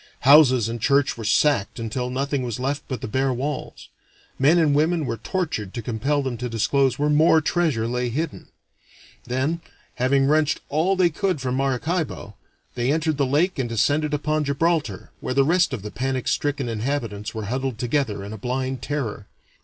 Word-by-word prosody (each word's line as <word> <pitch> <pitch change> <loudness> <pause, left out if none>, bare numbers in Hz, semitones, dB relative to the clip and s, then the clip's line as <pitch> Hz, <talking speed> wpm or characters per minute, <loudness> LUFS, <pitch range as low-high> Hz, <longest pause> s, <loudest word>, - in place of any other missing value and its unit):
Houses 130 -4 +6
and 115 0 -5
churches 140 +2 +2
were 115 - -7
sacked 110 0 +2
until 120 +2 -3
nothing 140 +2 -1
was 120 -2 -4
left 135 +3 -1
but 130 -5 -4
the - - -4
bare 130 +4 0
walls; 135 +4 -4 0.5
men 145 +6 +5
and 155 -4 +3
women 160 +2 +2
were 115 - -3
tortured 155 - -3
to 120 - -3
compel 135 +6 -1
them 130 -3 -3
to 125 +1 -4
disclose 130 +4 +1
where 145 - +1
more 160 +2 +5
treasure 155 -8 0
lay 125 +1 -1
hidden. 155 +8 -4 0.8
Then, 130 +7 -1 0.4
having 135 +2 +2
wrenched 150 +1 +2
all 165 +6 +1
that 185 - +2
they 175 - +5
could 185 0 -1
from 130 -1 -2
Maracaibo, 135 - -2 0.4
they 125 +2 0
entered 155 -1 0
the 140 -2 +1
lake 155 +6 +1
and 125 -3 -1
descended 145 +7 +1
upon 150 +1 0
Gibraltar, 145 - -1
where 130 - -3
the 135 0 +4
rest 175 +1 +3
of 120 -7 -5
the 105 - -6
panic 130 -1 -2
stricken 145 -3 0
inhabitants 115 -2 -3
were 110 -1 -4
huddled 130 +2 -2
together 120 -4 -1
in 100 +2 -7
a 110 - -8
blind 130 +3 -2
terror. 125 -8 -4
135 Hz, 185 wpm, -23 LUFS, 120-150 Hz, 0.8 s, Houses